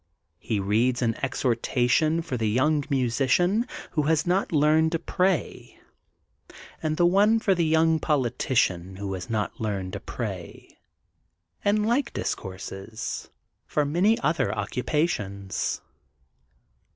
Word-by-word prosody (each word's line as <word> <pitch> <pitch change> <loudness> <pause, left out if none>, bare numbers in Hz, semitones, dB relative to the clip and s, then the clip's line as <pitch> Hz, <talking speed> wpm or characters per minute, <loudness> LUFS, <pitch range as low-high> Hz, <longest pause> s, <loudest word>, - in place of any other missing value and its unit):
'' 85 - -50
He 110 -4 -2
reads 115 +6 +1
the 115 -2 +2
exhortation 130 +5 +1
for 160 -6 -4
The 110 -3 0
Young 145 +6 +2
Musician 140 - +2 0.2
who 155 - +1
has 160 -2 +2
not 180 +3 +1
learned 155 +1 +3
to - - +2
Pray,*' 180 0 -1 1.0
and 155 0 -1
the 175 - +4
one 205 +5 +4
for 200 -3 +2
The 170 -2 +1
Young 160 0 +3
Politician 120 - 0
who 100 0 -4
has 95 +4 -6
not 110 -1 -2
learned 100 -4 -3
to - - -4
Pray,'' - - -7 0.9
and 210 +1 +2
like 240 +5 +1
discourses 95 +3 -5 0.4
for 150 - +1
many 180 +10 +3
other 155 +4 +1
occupations. 105 - -2
140 Hz, 125 wpm, -26 LUFS, 110-165 Hz, 1.0 s, the